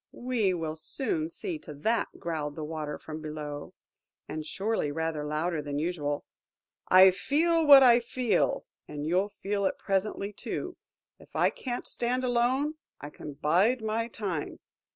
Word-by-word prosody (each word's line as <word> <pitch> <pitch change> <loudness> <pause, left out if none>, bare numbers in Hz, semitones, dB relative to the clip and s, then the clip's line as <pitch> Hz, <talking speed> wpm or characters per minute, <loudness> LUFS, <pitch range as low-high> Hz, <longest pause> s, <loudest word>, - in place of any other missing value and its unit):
"We 245 -6 0
will 160 -2 -3
soon 310 - -2
see 345 -1 -5
to 150 - -10
that," 225 +11 +1
growled 155 -4 -3
the 155 - -5
Water 150 -1 -4
from 155 0 -8
below, 150 -1 -6 0.5
and 155 +1 -4
surely 195 -1 -1
rather 160 0 -2
louder 155 +2 -1
than 145 -1 -4
usual. 150 -3 -2 0.6
"I 185 +1 +8
feel 325 - +2
what 280 -2 +11
I 240 -2 +7
feel, 240 0 0 0.2
and 150 0 -5
you'll 185 +5 +1
feel 200 -1 -1
it - - -3
presently, 200 +1 -1
too. - - -5 0.4
If - - -18
I - - +3
can't 245 -2 -5
stand 250 +2 0
alone, 255 +5 +1 0.2
I 145 - -8
can 150 - -8
bide 185 - +2
my 220 +1 -1
time. 195 -9 -4
190 Hz, 150 wpm, -29 LUFS, 155-240 Hz, 0.6 s, what